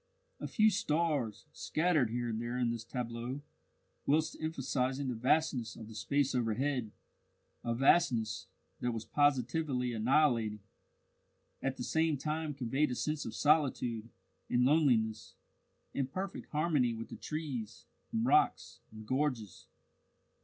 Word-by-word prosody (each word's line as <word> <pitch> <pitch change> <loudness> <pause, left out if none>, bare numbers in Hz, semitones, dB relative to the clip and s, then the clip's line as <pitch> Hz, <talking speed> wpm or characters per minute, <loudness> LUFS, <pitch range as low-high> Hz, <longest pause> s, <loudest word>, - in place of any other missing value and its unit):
A - - -4
few 215 -2 +4
stars, 155 - 0
scattered 155 -7 +1
here 120 +1 -2
and 110 0 -2
there 120 +1 -3
in 120 -2 +1
this 115 -1 -4
tableau, 120 +3 -4 0.6
whilst 155 +3 +2
emphasizing 135 -3 -1
the - - -1
vastness 125 -1 +1
of 110 - -9
the 110 - -10
space 135 +5 0
overhead 125 0 0 0.7
a 115 0 -1
vastness 130 -3 +3 0.3
that 120 -1 -1
was 115 -1 -5
positively 135 -2 +1
annihilating 115 -3 +2 1.0
at 135 0 -2
the 125 - -4
same 160 +2 +1
time 155 +1 -2
conveyed 135 +3 +1
a 125 - -2
sense 150 +2 -2
of 110 - -6
solitude 130 -7 +2 0.4
and 125 0 +3
loneliness, 120 -7 +2 0.6
in 135 -2 0
perfect 185 +8 -5
harmony 150 -6 +1
with 115 0 -7
the - - -7
trees, 135 -9 -5 0.3
and 225 0 0
rocks, 380 +9 +2
and 110 0 -10
gorges. 130 - -2
130 Hz, 130 wpm, -33 LUFS, 115-150 Hz, 1.0 s, few